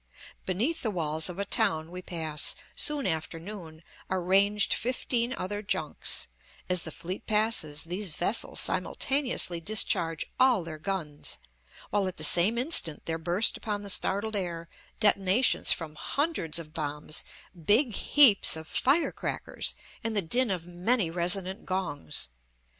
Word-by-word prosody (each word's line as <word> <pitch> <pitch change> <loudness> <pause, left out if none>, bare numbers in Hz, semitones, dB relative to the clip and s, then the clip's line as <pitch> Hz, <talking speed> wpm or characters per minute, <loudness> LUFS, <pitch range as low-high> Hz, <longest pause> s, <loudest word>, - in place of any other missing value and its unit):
Beneath 235 - -1
the 225 - -1
walls 160 -3 0
of 180 - -8
a 200 - -3
town 160 -3 +1
we 180 0 -7
pass 160 -3 0 0.2
soon 295 -2 +2
after 160 +1 -3
noon 165 -4 -10 0.3
are 185 -1 -2
ranged 200 +3 +2
fifteen 245 -1 -1
other 205 -4 -4
junks; 210 - -2 0.4
as 180 -2 +1
the 160 - -5
fleet 180 +5 -7
passes, 210 -9 +1
these 180 0 -5
vessels 200 +6 0
simultaneously 255 -11 0
discharge 165 -4 +2
all 255 -7 +4
their 160 -2 -8
guns, 160 -5 -4 0.5
while 200 -2 +1
at 185 - -6
the - - 0
same 195 +7 +7
instant 240 - +3
there 165 0 -3
burst 175 +6 0
upon 205 -2 -4
the 200 - 0
startled 205 +4 -1
air 170 -4 -4 0.3
detonations 205 +2 +3
from 160 -3 -2
hundreds 275 - -2
of 155 -2 -4
bombs, 150 -1 -4 0.4
big 225 - +2
heaps 245 - +6
of 160 0 -8
firecrackers, 280 - -1 0.3
and 225 -1 -2
the 200 - +2
din 245 +9 +1
of 180 -4 -3
many 180 +2 +1
resonant 185 +3 -1
gongs. 155 - -2
185 Hz, 140 wpm, -28 LUFS, 165-215 Hz, 0.5 s, same